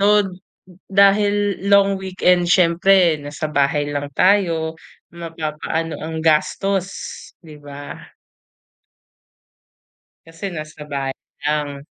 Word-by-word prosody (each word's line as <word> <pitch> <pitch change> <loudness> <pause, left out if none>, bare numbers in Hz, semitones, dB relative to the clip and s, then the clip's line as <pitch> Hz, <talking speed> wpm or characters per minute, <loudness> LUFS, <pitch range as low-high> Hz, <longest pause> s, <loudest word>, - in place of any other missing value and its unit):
So, 205 0 +4 0.6
dahil 205 0 +3
long 200 -1 +4
weekend 180 -2 +1
siyempre 175 -1 +4
nasa 145 +2 -5
bahay 145 0 +1
lang 145 0 -3
tayo 170 -3 +2 0.4
mapapaano 165 -1 -4
ang 160 0 -4
gastos, 185 +4 +1 0.5
'di 155 -3 -13
ba? 145 0 -10 2.2
Kasi 165 +3 -9
nasa 155 -1 -8
bahay 135 -1 -3 0.3
lang. 145 -2 -2
165 Hz, 90 wpm, -20 LUFS, 150-195 Hz, 2.2 s, So